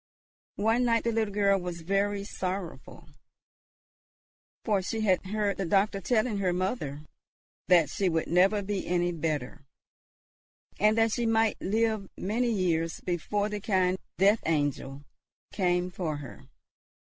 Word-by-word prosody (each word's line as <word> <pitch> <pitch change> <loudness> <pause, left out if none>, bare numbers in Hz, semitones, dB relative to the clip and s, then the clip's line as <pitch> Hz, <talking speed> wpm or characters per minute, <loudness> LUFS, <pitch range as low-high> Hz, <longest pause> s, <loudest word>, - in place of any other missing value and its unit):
One 225 +4 +2
night 230 -1 +2
the 235 - 0
little 220 -2 0
girl 200 -1 +2
was 175 -2 -6
very 200 +3 0
sorrowful, 185 -10 -6 1.6
for 205 -4 +2
she 220 +4 -3
had 190 -2 +1
heard 205 -1 -1
the 195 - -2
doctor 195 +2 +2
telling 220 -1 +1
her 185 -2 +1
mother 175 - -2 0.7
that 175 -4 +5
she 195 -2 0
would 165 -1 0
never 195 +4 +3
be 200 0 -3
any 175 0 +1
better, 155 -3 -3 1.2
and 215 +2 +4
that 225 0 +3
she 235 +1 0
might 225 -1 +2
live 220 0 0
many 235 +5 0
years 165 -5 0
before 195 +4 -1
the 210 -1 -5
kind 190 -3 +1 0.2
death 200 +4 +4
angel 145 -3 -1 0.5
came 180 -2 0
for 170 -5 -3
her. 140 -4 -10
195 Hz, 135 wpm, -28 LUFS, 175-210 Hz, 1.6 s, that